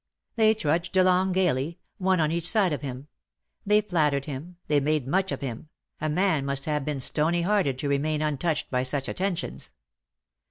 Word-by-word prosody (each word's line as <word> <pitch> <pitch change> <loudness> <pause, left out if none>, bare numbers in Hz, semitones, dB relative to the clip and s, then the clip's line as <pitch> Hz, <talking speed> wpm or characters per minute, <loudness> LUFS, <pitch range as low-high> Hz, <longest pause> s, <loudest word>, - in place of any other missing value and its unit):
They 220 -1 +4
trudged 170 -1 -1
along 185 0 +3
gaily, 170 -4 0 0.2
one 185 -1 +2
on 155 -1 +2
each 170 +1 +1
side 195 -6 +3
of 145 - -3
him; 135 0 -6 0.6
they 210 +1 +5
flattered 150 -8 0
him, 155 +5 -7
they 150 -1 +3
made 150 -1 0
much 190 +6 +1
of - - -4
him 130 +2 -6
— - - -40
a 155 - 0
man 170 -2 +1
must 140 0 -1
have 150 -2 -1
been 145 -1 -3
stony 160 +6 +2
hearted 185 -9 +1
to 145 - -3
remain 150 +2 0
untouched 150 +1 -1
by 125 -1 +1
such 135 +1 -1
attentions. 170 - -3
155 Hz, 185 wpm, -26 LUFS, 140-185 Hz, 0.6 s, they